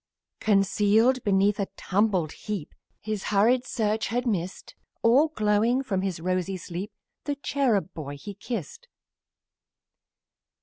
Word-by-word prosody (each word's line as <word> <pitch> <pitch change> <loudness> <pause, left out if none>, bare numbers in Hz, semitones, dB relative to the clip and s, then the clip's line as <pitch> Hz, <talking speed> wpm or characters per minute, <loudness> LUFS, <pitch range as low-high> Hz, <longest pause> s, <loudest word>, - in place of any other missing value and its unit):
Concealed 215 +4 +3
beneath 200 0 +2
a 200 - 0 0.2
mangled 190 -5 +2
heap 205 -8 -6 0.3
His 215 -2 -4
hurried 235 +5 +3
search 220 -2 0
had 245 +2 -1
missed, 185 -6 -3 0.3
All 260 +7 +5
glowing 225 -1 +1
from 195 -7 -1
his 190 -4 -2
rosy 185 +2 -1
sleep, 180 +4 -6 0.3
His 290 - -2
cherub 230 -10 +1
boy 145 -2 -6
he 205 +8 -8
kissed. 255 - -6
210 Hz, 120 wpm, -26 LUFS, 190-235 Hz, 0.3 s, All